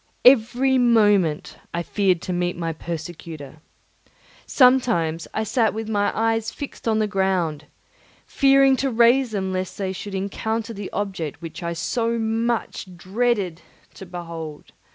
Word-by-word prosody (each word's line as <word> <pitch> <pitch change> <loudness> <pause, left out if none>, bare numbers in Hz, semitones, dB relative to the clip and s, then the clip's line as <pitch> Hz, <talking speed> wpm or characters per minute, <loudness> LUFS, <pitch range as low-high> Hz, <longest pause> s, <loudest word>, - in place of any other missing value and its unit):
Every 255 +1 +5
moment 205 -10 +3 0.2
I 170 - -1
feared 185 -2 +1
to 180 - -3
meet 175 0 -1
my 165 -1 -2
persecutor. 160 -3 -7 0.9
Sometimes 235 - +3
I 220 - -1
sat 220 0 +1
with 220 0 -4
my 205 -2 +1
eyes 225 0 +1
fixed 285 -3 -8
on 220 -1 +2
the 215 - +2
ground, 190 -6 -1 0.6
fearing 275 -1 +4
to 270 - 0
raise 240 +2 +4
them 190 -3 -2
lest 185 -1 -3
they 190 -2 -2
should 195 +1 -6
encounter 220 +4 -3
the 200 -2 -6
object 185 -7 -4
which 165 -1 -8
I 170 0 -3
so 230 +7 -1
much 225 -2 -2
dreaded 195 -2 -1 0.3
to 190 - -11
behold. 165 -3 -8
205 Hz, 140 wpm, -23 LUFS, 170-230 Hz, 0.9 s, Every